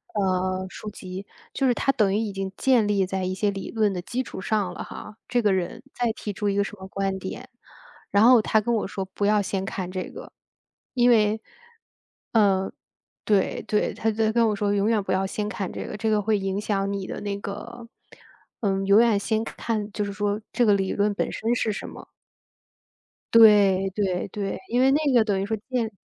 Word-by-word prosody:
呃， 185 -1 0
书 215 - -8
籍。 190 -1 -8 0.3
就 270 -1 +1
是 245 - +4
它 270 - +1
等 215 -8 +2
于 205 - +2
已 215 -2 -1
经 195 0 -4
建 245 -5 +3
立 200 -2 +2
在 190 0 -3
一 185 +1 -1
些 205 +2 0
理 195 -1 -6
论 215 -3 +1
的 180 - -3
基 245 +8 -3
础 190 - -8
上 195 -3 -1
了 - - -6
哈， 210 - -9
这 245 0 +1
个 205 -3 +3
人 180 +4 -3
再 240 -2 0
提 210 -2 -6
出 205 +1 -1
一 200 - 0
个 200 - +3
什 205 - -7
么 190 0 -9
观 195 0 -2
点。 250 +7 -7 0.6
然 200 +2 +4
后 245 -1 +7
他 215 0 +2
跟 235 +3 -1
我 220 - 0
说 195 -1 -4
不 205 - -1
要 210 0 +4
先 195 -1 -2
看 185 -2 -4
这 185 0 -3
个。 - - -10 0.6
因 245 -1 +4
为 215 -1 +3 0.9
嗯， 195 -4 +3 0.5
对 200 -3 +1
对， 210 - +1
他 225 - -1
就 220 0 +1
跟 230 -1 +4
我 210 - 0
说 205 0 0
永 205 +1 +2
远 220 -2 +2
不 - - -3
要 190 +1 +1
先 210 +2 -3
看 200 -3 -4
这 - - -6
个， - - -6
这 220 +1 -1
个 210 -1 +2
会 215 +1 +1
影 195 0 -2
响 200 -2 -1
你 195 -1 -3
的 - - -6
那 200 -1 -3
个 230 +4 -7 0.7
嗯， 195 -2 0
永 200 +3 +6
远 230 -3 +4
先 220 +1 0
看 215 -2 -3
就 210 - -2
是 200 - -3
说 205 +1 -1
这 245 - +2
个 210 - +5
理 195 -1 0
论 205 0 +1
本 - - -2
身 230 +2 -1
是 220 - 0
什 195 - -5
么。 - - -11 1.3
对， 200 -4 +6
对 190 -3 -1
对， 200 0 -3
因 245 +2 +2
为 265 - +5
那 290 -1 +2
个 235 -3 +6
等 205 -3 0
于 195 - -1
说， 220 +2 -1
建 235 -4 -1
205 Hz, 235 characters per minute, -25 LUFS, 195-220 Hz, 1.3 s, 后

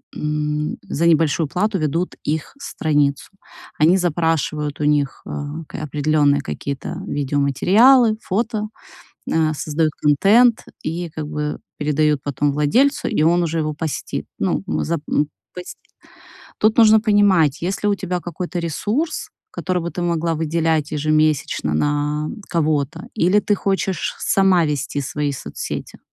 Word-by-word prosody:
м, 150 0 -2
за 170 - -2
небольшую 160 -1 +3
плату 195 +6 0
ведут 165 +4 -1
их 155 - -3
страницу. 145 - 0 0.5
Они 165 +5 +5
запрашивают 160 -4 -1
у - - -2
них, 145 -2 +1
э, - - -9 0.4
к - - -11
определённые 145 -1 +2
какие-то 140 +3 -5
видеоматериалы, 190 - +3
фото, 215 +1 -2 0.6
э, 160 -1 +2
создают 155 +1 -1
контент 210 - +4 0.2
и, 170 +2 -4
как 155 -1 -6
бы, 150 0 -3 0.2
передают 150 0 +1
потом 145 0 0
владельцу, 235 - +2
и 210 - 0
он 170 +2 +3
уже 165 -1 -1
его 155 -1 -1
постит. 155 -1 -4
Ну, - - -1 0.2
зап 165 -1 -1
ну, 145 0 +1 0.3
пость 180 0 -8 0.8
Тут 215 +1 +3
нужно 220 -1 +7
понимать, 195 - +3
есть 185 +2 -2
ли - - +4
у 205 - +3
тебя 185 -2 -3
какой-то 175 +2 -5
ресурс, 210 - -2 0.2
который 185 - -2
бы 170 - -3
ты 175 - -4
могла 170 -1 0
выделять 160 -1 0
ежемесячно 155 - +1
на 150 - 0 0.2
кого-то, 155 -5 0
или 185 +5 +3
ты 205 - +1
хочешь 195 -1 -1
сама 190 -3 +3
вести 145 -1 -2
свои 145 +2 -2
соцсети? 135 - -6
160 Hz, 135 wpm, -20 LUFS, 150-185 Hz, 0.8 s, нужно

